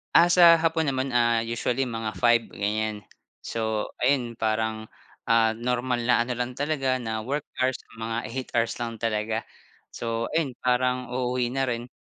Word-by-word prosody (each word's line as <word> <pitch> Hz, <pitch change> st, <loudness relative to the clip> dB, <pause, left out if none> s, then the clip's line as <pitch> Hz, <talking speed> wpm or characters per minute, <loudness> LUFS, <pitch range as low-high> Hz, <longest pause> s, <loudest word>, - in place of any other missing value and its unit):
Ah, 170 Hz, -, +8 dB
sa 170 Hz, -2 st, +7 dB
hapon 165 Hz, 0 st, +1 dB
naman, 130 Hz, 0 st, -1 dB
ah, 120 Hz, -1 st, +4 dB
usually 120 Hz, +3 st, -1 dB
mga 115 Hz, -2 st, -3 dB
5 120 Hz, -1 st, +4 dB
ganyan. 105 Hz, +1 st, -2 dB, 0.4 s
So, 110 Hz, -2 st, -2 dB, 0.2 s
ayun 125 Hz, -4 st, +1 dB
parang, 110 Hz, 0 st, -1 dB, 0.3 s
ah, 115 Hz, -1 st, +3 dB
normal 125 Hz, +1 st, -1 dB
na 120 Hz, 0 st, +3 dB
ano 120 Hz, +1 st, -1 dB
lang 125 Hz, +1 st, -2 dB
talaga, 135 Hz, -2 st, -1 dB
na 110 Hz, -2 st, -3 dB
work 140 Hz, +4 st, -3 dB
hours, 130 Hz, 0 st, 0 dB, 0.2 s
mga 115 Hz, 0 st, -3 dB
8 130 Hz, +3 st, -5 dB
hours 115 Hz, -1 st, +1 dB
lang 115 Hz, -2 st, -5 dB
talaga. 110 Hz, 0 st, -1 dB, 0.5 s
So, 115 Hz, 0 st, -2 dB
ayun 160 Hz, -5 st, +1 dB
parang 125 Hz, 0 st, +1 dB
uuwi 125 Hz, -1 st, 0 dB
na 135 Hz, -, +1 dB
rin. 120 Hz, -1 st, -2 dB
120 Hz, 160 wpm, -26 LUFS, 115-130 Hz, 0.5 s, Ah